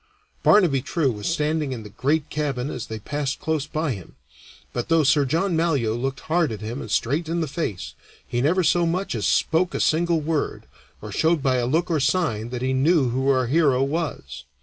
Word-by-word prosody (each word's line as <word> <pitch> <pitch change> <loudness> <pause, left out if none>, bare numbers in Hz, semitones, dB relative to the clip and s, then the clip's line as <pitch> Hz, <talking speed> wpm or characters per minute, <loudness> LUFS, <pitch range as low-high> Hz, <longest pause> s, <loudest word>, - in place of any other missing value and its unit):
Barnaby 170 -11 +4
True 145 0 0
was 105 -2 -5
standing 150 -3 0
in 115 -3 -6
the 105 - -10
great 145 +7 -1
cabin 145 -3 -2
as 125 - -5
they 110 - -5
passed 140 +5 -3
close 155 -2 -1
by 155 -1 -1
him; 95 -7 -8 0.6
but 120 +4 -3
though 165 -1 +4
Sir 145 0 +3
John 165 +6 0
Malyoe 145 -9 +1
looked 130 +3 -3
hard 160 -3 +1
at 110 - -5
him 115 +5 -5
and 110 - -7
straight 145 +10 0
in 170 +1 -1
the 160 - -1
face, 135 - -4 0.3
he 120 - -1
never 175 +7 +2
so 170 +1 +3
much 185 +4 -1
as 105 -8 -1
spoke 160 - +1
a - - -1
single 170 +1 +2
word, 155 -1 -2 0.4
or - - -7
showed 160 -2 +1
by 130 -2 +2
a 120 -1 0
look 170 +6 0
or 160 - +2
a - - -1
sign 120 -9 0
that 125 0 -4
he 130 0 0
knew 140 0 +3
who 130 +3 0
our 130 -2 +3
hero 135 -1 +3
was. 135 - -4
145 Hz, 215 wpm, -23 LUFS, 125-165 Hz, 0.6 s, Barnaby